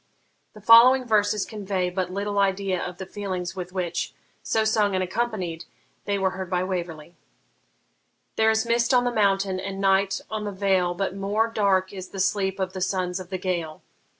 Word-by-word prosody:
The 210 - -13
following 240 +4 +7
verses 210 -2 +2
convey 195 -4 -3
but 180 -1 -2
little 200 +1 -2
idea 195 -2 0
of 180 -1 -6
the 190 - -6
feelings 185 -3 -5
with 180 -1 -6
which, 175 -2 -3 0.3
so 220 -1 0
sung 210 -2 +2
and 185 - +1
accompanied, 185 -5 -3 0.4
they 200 0 0
were 190 -1 +1
heard 185 -1 -6
by 180 -1 0
Waverley: 175 -3 -5 1.2
There 220 0 +3
is 220 +1 +2
mist 235 +2 +2
on 245 - +4
the 245 - 0
mountain, 195 -3 +1
and 195 +1 -5
night 195 0 +2
on 215 -1 -4
the 205 - -3
vale, 190 -2 +1
But 195 +1 -2
more 205 +3 0
dark 195 -4 +1
is 185 -2 -7
the 195 - -8
sleep 190 0 0
of 185 -1 -2
the 185 - -5
sons 185 -1 -1
of 185 -1 -9
the 190 - -3
Gael. 175 -4 -3
195 Hz, 185 wpm, -25 LUFS, 185-210 Hz, 1.2 s, following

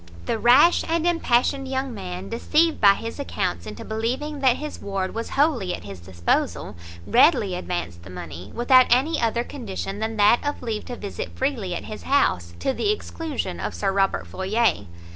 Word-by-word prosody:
The 225 - -1
rash 265 +10 +6
and 330 0 0
impassioned 270 -5 +1
young 265 -1 -2
man, 185 -2 -6
deceived 310 +8 +1
by 200 -2 +7
his 230 +6 -6
accounts 85 - -3
into 105 - -8
believing 255 +7 -3
that 260 -3 +4
his 300 +2 -7
ward 195 -2 -3
was 230 +1 -4
wholly 275 - +1
at - - -11
his 100 -2 -9
disposal, 85 0 -1 0.3
readily 245 - +4
advanced 85 - -4
the 90 - -12
money, 90 0 -8
without 255 +1 +5
any 265 +6 +2
other 235 +1 +1
condition 205 -6 -6
than 220 0 -3
that 210 +3 +5
of 290 -2 -3
leave 220 -3 -3
to 245 - -6
visit 200 -4 -6
freely 235 -10 -1
at - - -5
his 215 - -8
house, 90 - +1
to 270 - 0
the 410 - -1
exclusion 320 - -4
of 95 +1 -4
Sir 85 - 0
Robert 195 0 +1
Floyer. 190 - 0
230 Hz, 180 wpm, -24 LUFS, 185-270 Hz, 0.3 s, by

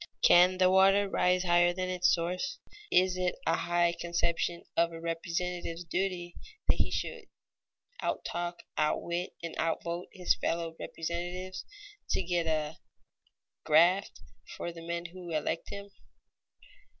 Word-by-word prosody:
Can 180 +1 +7
the 185 0 +5
water 195 +1 +5
rise 180 -1 +2
higher 175 0 +4
than 185 0 -2
its 185 0 +3
source? 180 +9 -1 0.3
Is 185 0 +4
it 180 -1 0
a 165 - +3
high 175 0 +2
conception 170 0 0
of 170 0 +3
a 165 - -7
representative's 170 +1 -3
duty 175 0 -2 0.3
that - - +3
he - - +2
should - - -3 0.8
out - - -2
talk, 175 0 -4 0.2
outwit, 170 +3 -1
and 170 - -4
out 165 -1 0
vote 170 +1 -4
his 180 -2 +2
fellow 165 -1 -2
representatives, 175 +3 -4 0.4
to - - +1
get 175 -1 0
"a 155 -1 -1 0.8
graft" 170 +5 +4 0.4
for 170 - -4
the 165 0 -10
men 170 +1 -4
who 175 0 -8
elect 160 +1 -2
him? 200 0 -7
175 Hz, 140 wpm, -31 LUFS, 170-185 Hz, 0.8 s, Can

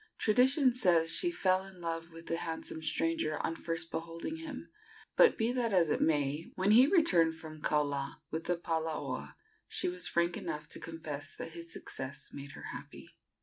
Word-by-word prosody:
Tradition 255 +4 +4
says 170 -8 +4
she 350 - +5
fell 190 - +2
in 190 -1 -13
love 165 -1 -3
with 165 +1 -11
the 165 - -1
handsome 160 -1 -4
stranger 165 -1 0
on 165 - -2
first 165 0 -4
beholding 165 - -4
him; 310 -2 -7 0.4
but 480 - +6
be 225 +2 +1
that 240 -4 0
as 170 -5 +4
it - - +1
may, 150 0 +1
when 190 +2 +2
he 245 +5 +8
returned 175 - +4
from 155 -1 -10
Kaula 145 -2 0 0.2
with 160 +1 -3
the 175 - +1
palaoa 160 -2 -3 0.3
she - - -1
was 180 0 -2
frank 170 0 +1
enough 150 0 -4
to - - -6
confess 155 -3 -5
that - - -6
his 170 0 -8
success 135 +1 -5
had - - -12
made 140 0 -8
her - - -9
happy. - - -9
165 Hz, 185 wpm, -32 LUFS, 160-195 Hz, 0.4 s, he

